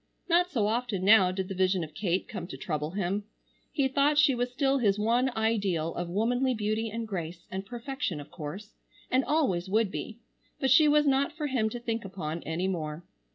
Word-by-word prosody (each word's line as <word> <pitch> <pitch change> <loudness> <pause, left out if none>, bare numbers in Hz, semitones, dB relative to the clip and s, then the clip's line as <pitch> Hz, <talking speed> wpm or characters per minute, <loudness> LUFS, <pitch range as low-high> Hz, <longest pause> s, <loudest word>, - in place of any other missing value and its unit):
Not 355 +1 +3
so 235 - 0
often 220 -3 -1
now 195 -3 +7
did 190 0 -3
the 195 - -4
vision 185 -1 +1
of 155 - -8
Kate 185 -2 -1
come 175 - -6
to - - -8
trouble 150 -3 -3
him. 195 +2 -2 0.5
He 280 -4 +1
thought 280 +2 +2
she 295 -2 +6
was 245 0 -1
still 275 +1 +1
his 205 -4 +2
one 235 +5 +2
ideal 200 -8 0
of 175 0 -4
womanly 245 +7 +1
beauty 215 +1 -1
and 225 +1 -4
grace 170 -4 -5
and 190 +1 -5
perfection 240 - -4
of 145 - -11
course, 175 +6 -7 0.4
and 260 +1 +3
always 195 - +1
would 215 0 +2
be, 220 - -5 0.4
but 265 -2 +1
she 300 +4 +7
was 295 0 +4
not 275 0 +2
for 305 - -2
him 250 -6 +1
to 240 - -6
think 230 -1 -3
upon 170 -4 -5
any 165 +4 -1
more. 160 -3 -3
215 Hz, 200 wpm, -29 LUFS, 185-255 Hz, 0.5 s, now